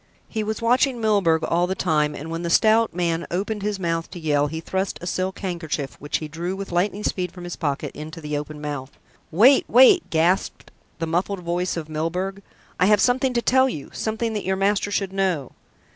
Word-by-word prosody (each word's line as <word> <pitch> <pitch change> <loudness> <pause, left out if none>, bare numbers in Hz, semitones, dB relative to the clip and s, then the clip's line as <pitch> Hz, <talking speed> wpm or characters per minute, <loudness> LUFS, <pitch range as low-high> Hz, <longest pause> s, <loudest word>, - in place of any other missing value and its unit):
He 220 -1 -3
was 220 +1 -3
watching 250 +2 +3
Milburgh 200 -8 +2
all 175 +1 +1
the 190 - -2
time, 150 -3 +1
and 160 +3 -7
when 165 +1 -3
the 170 - -2
stout 220 +5 +4
man 170 -1 -1
opened 205 +4 -2
his 205 -1 -2
mouth 165 -2 -2
to 180 - -8
yell 145 -2 +1
he 160 +2 -5
thrust 190 +3 -2
a - - -8
silk 185 +2 -2
handkerchief, 160 -7 -3
which 145 - -2
he 155 - -6
drew 170 +4 -4
with 195 -1 -6
lightning 195 +4 0
speed 180 -4 -1
from 180 - -10
his 175 0 -5
pocket, 145 -4 -3
into 155 +2 -8
the 150 -1 -4
open 150 +1 -5
mouth. 145 -3 -5 0.4
"Wait, 240 - +6
wait!" 260 - +6
gasped 170 +4 0 0.3
the 165 - -2
muffled 180 +4 -1
voice 175 +1 -2
of 160 -2 -4
Milburgh. 180 +5 -3 0.4
"I 185 - +4
have 210 -1 +5
something 255 +4 +2
to 235 -1 0
tell 260 +1 +4
you 145 - -7
something 220 +1 -2
that 210 - -3
your 190 +1 0
master 200 +1 +1
should 195 -1 -2
know." 185 -8 -1
180 Hz, 205 wpm, -23 LUFS, 160-205 Hz, 0.4 s, Wait